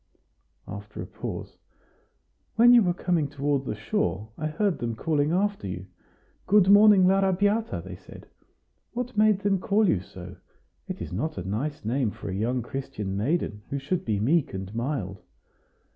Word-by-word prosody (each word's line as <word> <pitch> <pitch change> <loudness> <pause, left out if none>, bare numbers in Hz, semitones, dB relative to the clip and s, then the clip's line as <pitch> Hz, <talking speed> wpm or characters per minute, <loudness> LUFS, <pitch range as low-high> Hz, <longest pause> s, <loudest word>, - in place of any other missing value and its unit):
After 105 +1 -8
a - - -4
pause: - - -7 1.0
"When 240 +2 +7
you 240 - +8
were 180 -4 +2
coming 175 -5 0
toward 140 -1 -1
the 110 - -3
shore, 110 - -2
I 155 - -3
heard 185 +4 0
them 115 -1 -2
calling 150 +3 0
after 200 - 0
you. 90 0 -5 0.6
'Good 200 -1 +5
morning, 205 -2 +7
l'Arrabiata!' 195 +4 +2
they - - -8
said. - - -13 0.7
What 250 0 -4
made 210 -2 +4
them 200 -2 +1
call 205 +3 +2
you 105 - +2
so? 90 -1 -11 0.5
It - - -5
is - - -7
not 145 - -2
a 90 0 -5
nice 140 +7 -3
name 120 +1 +1
for 100 -1 -7
a - - -4
young 115 +5 -1
Christian 105 -8 -5
maiden, 110 - -1
who 140 - -2
should 145 +6 -2
be 105 -3 -1
meek 140 - +1
and 95 +1 -6
mild." 115 -6 -3
145 Hz, 165 wpm, -26 LUFS, -, 1.0 s, you